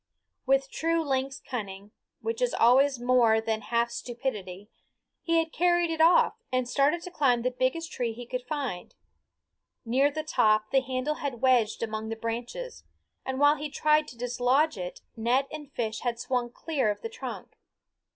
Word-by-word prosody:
With 270 0 +2
true 330 0 0
lynx 270 0 -1
cunning, 200 -4 -6 0.3
which 455 +2 -3
is - - +1
always 260 +3 +4
more 240 -3 +4
than 220 0 -2
half 235 +2 0
stupidity, 210 -6 -5 0.5
he 335 -1 +1
had 325 -1 0
carried 345 -1 +2
it 320 -1 -1
off 335 +2 +5 0.2
and 255 -1 0
started 290 +7 +2
to 360 - -7
climb 250 -8 +2
the 255 - +1
biggest 255 +7 -1
tree 240 -2 -2
he 240 +2 -8
could 250 +1 -4
find. 275 - -4 0.9
Near 260 +5 +3
the 310 +2 -4
top 215 -7 +2
the 270 - +4
handle 260 +3 -2
had 270 -5 -3
wedged 240 -4 +3
among 220 0 -4
the 225 - -3
branches, 240 - -5 0.4
and 265 0 -2
while 290 +1 +5
he 300 +1 -4
tried 305 +1 +2
to 240 - -11
dislodge 245 +5 +1
it 180 -2 -6
net 245 +4 +1
and 295 -2 -8
fish 220 -4 -3
had 240 -2 -2
swung 245 -1 -1
clear 275 -5 -1
of 205 - -3
the - - -2
trunk. 475 +1 -8
255 Hz, 170 wpm, -28 LUFS, 235-300 Hz, 0.9 s, off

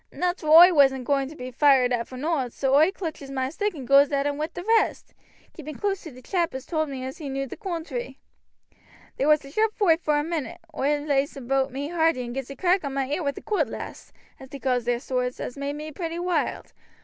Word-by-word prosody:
"Nateral 355 -3 -1
oi 350 +3 +10
wasn't 270 -3 +4
a - - -8
going 275 0 0
to 310 - -11
be 255 -1 -7
fired 260 -2 +4
at 235 -1 -1
for 255 - -9
nowt, 280 -3 -1
so 270 -1 0
oi 310 +6 +5
clutches 320 -8 -6
moi 260 -1 -2
stick 410 +5 -2
and 265 -5 -8
goes 275 +1 +6
at 280 0 0
'em 290 0 0
wi' 310 - -1
the 355 - -7
rest, 450 +2 +1 0.4
keeping 305 -1 -8
close 400 -2 -2
to 320 - -9
t' 255 0 -14
chap 340 -4 -1
as 265 0 -6
told 315 -3 -1
me 260 -2 -5
as 265 +5 -7
he 295 -3 -5
knew 275 0 -2
the 265 - -8
coontry. 320 - -5 1.0
There 275 - +1
was 305 -1 +4
a 275 - -11
sharp 435 +5 +1
foight 345 -6 +3
vor 300 -1 +2
a 295 - +1
minute. 330 +1 -4 0.2
Oi 290 +2 +1
lays 285 -1 0
aboot 270 +1 0
me 280 +3 -4
hearty 325 -7 +1
and 240 - -6
gets 270 0 -5
a 275 - -7
crack 365 +2 +2
on 275 -1 -4
my 270 0 -1
ear 295 - -1
wi' 280 -3 -1
a - - -6
cootlas, 420 - -3 0.3
as 265 - -12
they 280 - -7
calls 250 -3 0
theer 240 0 0
swords, 250 -1 -2
as 250 - -5
made 280 0 -3
me 305 +1 -7
pretty 330 +2 -4
wild. 355 0 -2
285 Hz, 245 wpm, -25 LUFS, 265-330 Hz, 1.0 s, oi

